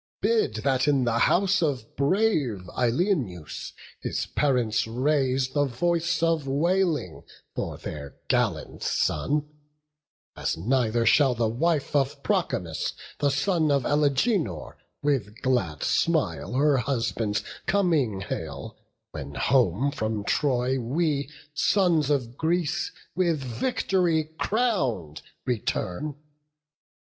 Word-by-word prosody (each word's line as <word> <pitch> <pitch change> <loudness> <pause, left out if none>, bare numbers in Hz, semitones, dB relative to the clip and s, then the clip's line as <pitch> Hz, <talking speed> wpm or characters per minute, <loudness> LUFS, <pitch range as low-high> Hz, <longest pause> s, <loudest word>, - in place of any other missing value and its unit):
bid 440 -2 +1
that 135 0 +2
in 140 -3 +3
the 115 -1 +1
house 190 +7 +3
Of 135 -8 -2
brave 140 - +1
Ilioneus 120 - -1 0.3
his - - -2
parents 125 -7 +1
raise 130 +1 +1
The 145 +1 +1
voice 170 +6 0
of 165 -4 +1
wailing 160 - +1 0.3
for - - -4
their 70 -2 -7
gallant - - 0
son; 150 +1 0 0.9
As - - -2
neither 115 +3 +1
shall 130 +2 +5
the 115 -1 +1
wife 150 +6 0
of 135 -1 0
Promachus, - - -1 0.3
The 145 - +3
son 160 +2 +1
of 140 -2 +2
Alegenor, 145 - +1 0.3
with 115 -7 0
glad 95 - 0
smile 100 - +1
Her 140 +2 +3
husband's 115 -5 -1 0.2
coming 155 - +2
hail, 80 -7 -6 0.3
when 70 +1 -7
home 125 - +2
from 110 -5 -2
Troy 130 +1 +1
We 140 +3 0 0.2
sons 165 -2 +2
of 125 -5 0
Greece, 165 -1 0 0.2
with 170 -6 +1
vict'ry 160 - 0
crown'd, 135 - 0 0.2
return." 125 +2 -2
135 Hz, 110 wpm, -26 LUFS, 115-160 Hz, 0.9 s, shall